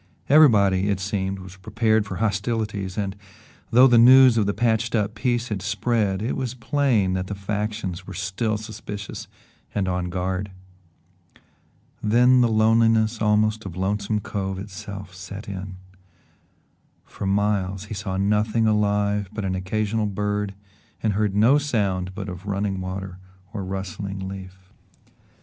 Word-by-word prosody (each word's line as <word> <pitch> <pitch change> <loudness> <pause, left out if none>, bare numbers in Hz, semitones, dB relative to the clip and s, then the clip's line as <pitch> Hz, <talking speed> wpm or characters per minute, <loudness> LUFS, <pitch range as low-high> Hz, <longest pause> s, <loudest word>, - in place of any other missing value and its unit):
Everybody, 100 -10 +5
it 100 -2 0
seemed, 95 -1 -2
was 95 0 -11
prepared 110 +1 +1
for 95 - -5
hostilities 105 -2 -2
and, 100 -2 -2 0.5
though 125 +2 +7
the 120 -3 +6
news 130 +1 +8
of 105 -3 +2
the - - +2
patched 115 0 +1
up 105 -1 0
peace 120 0 -1
had 105 -3 -3
spread, 105 0 0
it 115 - -1
was 130 -2 -3
plain 120 -6 +1
that 95 0 -2
the 105 - -4
factions 105 -2 -4
were - - -7
still 100 +4 -1
suspicious 105 -2 -7 0.5
and 100 -2 0
on 90 -1 -1
guard. 95 +2 -2 1.5
Then 125 +4 +4
the 120 - +4
loneliness 110 0 +3
almost 110 0 +2
of 90 -3 -8
Lonesome 105 +2 -1
Cove 95 -2 -3
itself 95 -1 -8
set 95 +3 -9
in. 95 -1 -6 1.3
For 100 - -6
miles 100 -1 0
he 110 - -7
saw 95 -2 -4
nothing 105 +3 +1
alive 105 -2 +1
but 105 -2 -4
an 95 - -1
occasional 105 +3 -1
bird 105 0 -2 0.5
and 110 -2 +1
heard 105 -1 0
no 120 +8 +5
sound 95 -10 -1
but 100 -1 -5
of 90 +1 -8
running 100 -1 -1
water 95 0 -6 0.3
or 100 -3 -4
rustling 95 0 -5
leaf. 95 -1 -10
105 Hz, 145 wpm, -23 LUFS, 95-110 Hz, 1.5 s, news